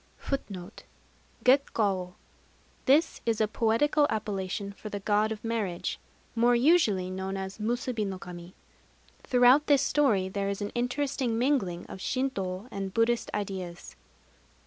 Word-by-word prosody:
Gekkawô. 205 -9 +2 0.7
This 295 +5 +3
is 230 -2 0
a 215 - +3
poetical 235 +8 +2
appellation 200 -1 -3
for 215 - -9
the 205 - -4
God 210 +2 +1
of 215 -1 -5
Marriage, 215 -7 -2 0.3
more 240 +1 +4
usually 235 - +3
known 190 +1 -3
as 190 +2 -6
Musubi 235 +1 -1
no 195 -2 -3
kami. 175 0 -10 0.7
Throughout 255 +4 +5
this 280 -2 +4
story 255 -11 +2
there 195 +1 -2
is 200 - -3
an 205 -1 -4
interesting 250 -1 -1
mingling 235 -9 0
of - - -9
Shintô 200 -5 -2
and 195 -1 -4
Buddhist 230 +3 +1
ideas. 185 -4 -5
215 Hz, 125 wpm, -28 LUFS, 190-250 Hz, 0.7 s, Throughout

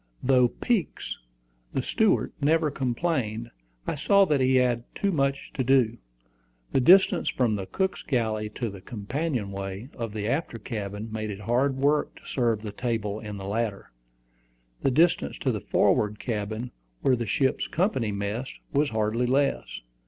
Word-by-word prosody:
Though 125 -1 +5
Peeks, 210 - -2 0.6
the - - +1
steward, - - +2
never 155 +1 +3
complained, 125 -4 -1 0.3
I - - -1
saw 195 +7 +4
that 150 -6 +2
he 130 0 +3
had 125 -2 +2
too 200 - +1
much 140 -4 0
to 130 - -1
do. 125 -3 +3 0.7
The - - +3
distance 185 +5 +6
from 120 -4 +1
the 95 -2 -4
cook's 190 0 -1
galley 110 -5 -1
to 120 -4 -2
the 95 -1 -10
companion 120 - -3
way 100 +4 -5
of 115 -3 -4
the 105 -1 -3
after 135 -1 -1
cabin 105 -1 -5
made 110 -1 -3
it 100 0 -6
hard 130 +5 +1
work 145 +2 +1
to - - -17
serve 115 -4 0
the 105 - -4
table 110 -2 -2
in 105 -2 -6
the 95 0 -6
latter. 105 - -2 0.9
The - - +3
distance 155 - +2
to - - 0
the - - -3
forward 105 0 +2
cabin, 110 +1 -3 0.3
where 130 - +4
the 120 -2 -3
ship's 130 +6 +1
company 155 - 0
messed, 100 +6 -3 0.2
was 145 +1 +3
hardly 110 +2 0
less. 135 +2 0
120 Hz, 160 wpm, -27 LUFS, 105-140 Hz, 0.9 s, distance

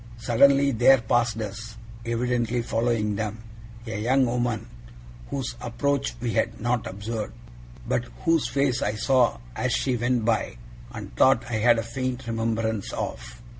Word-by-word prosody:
Suddenly 140 +4 +4
there 130 +2 +6
passed 115 -1 +1
us 110 +2 -7 0.3
evidently 120 0 0
following 115 -2 0
them 110 +1 -4 0.4
a 110 -2 -4
young 130 +4 +3
woman 120 -2 -1 0.6
whose 135 -3 -3
approach 120 - -1
we - - -2
had - - 0
not 120 0 -1
observed, 105 - -5 0.5
but - - 0 0.2
whose 165 -2 +3
face 135 -2 +1
I 105 - 0
saw 125 +1 +2 0.2
as - - 0
she 130 - +1
went 120 -1 0
by, 110 - 0 0.3
and - - -8
thought 130 - +4
I 110 - 0
had 120 +1 +5
a 115 - -1
faint 130 +2 -4
remembrance 115 -2 -1
of. 115 - -6
115 Hz, 145 wpm, -25 LUFS, 110-125 Hz, 0.6 s, there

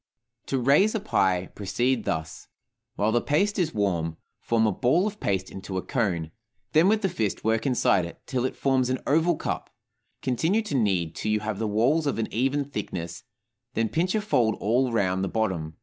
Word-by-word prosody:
To 135 - 0
"raise" 145 - +4
a - - +1
pie, 95 - +1
proceed 120 +4 -1
thus: 80 -1 -4 0.5
While 105 +2 +1
the 120 +1 +2
paste 200 +8 +1
is 165 -3 +1
warm, 85 -6 -1 0.2
form 115 -1 +1
a 110 - +3
ball 130 - +2
of 210 0 -4
paste 95 -1 -1
into 95 0 -6
a 95 - -2
cone; 90 - -1 0.4
then 160 +4 +5
with 215 +1 +2
the - - +4
fist 130 - -2
work 110 +3 +1
inside 110 -8 +3
it, 85 - -10
till 125 -2 -1
it 130 - -2
forms 130 -2 +1
an 130 - +1
oval 160 +4 +3
cup; - - -4 0.5
continue 165 - +1
to 210 -9 -4
knead 95 -9 +1
till 105 - -2
you 105 0 +1
have 105 -1 -3
the 110 - -1
walls 130 +10 +2
of 140 - 0
an 115 - -3
even 135 +5 +1
thickness, 90 -10 -5 0.5
then 115 0 +1
pinch 180 +5 0
a 215 - +1
fold 125 - +2
all 120 +4 +1
around 95 -4 +1
the 95 - -1
bottom. 90 -8 -2
115 Hz, 195 wpm, -26 LUFS, 100-145 Hz, 0.5 s, then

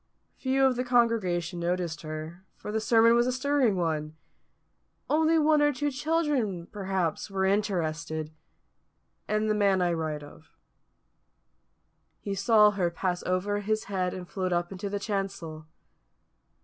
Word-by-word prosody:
Few 270 0 +1
of 260 -2 +2
the 250 - 0
congregation 210 -9 +1
noticed 170 -2 -2
her, 155 +3 -7
for - - -7
the 220 +1 -1
sermon 230 +1 +5
was 240 +1 +3
a - - +1
stirring 260 -4 +1
one; 155 -3 -2 1.0
only 320 +1 +3
one 305 -1 +4
or 295 0 +4
two 290 +1 -2
children, 265 - -1
perhaps, 190 -3 -2
were 190 -1 0
interested 165 -6 -1 0.9
and 215 0 0
the 215 - +2
man 200 -2 +3
I 175 -1 +1
write 155 -2 -3
of. 155 +2 -15 1.7
He 200 - -4
saw 210 +2 +5
her 190 -4 0
pass 175 +1 -2
over 190 +3 0
his 215 +1 -1
head 185 -2 -2
and 180 -1 -7
float 185 -1 -3
up 175 +1 0
into 195 +1 -5
the 205 - -2
chancel. 195 -7 -4
195 Hz, 145 wpm, -28 LUFS, 175-230 Hz, 1.7 s, sermon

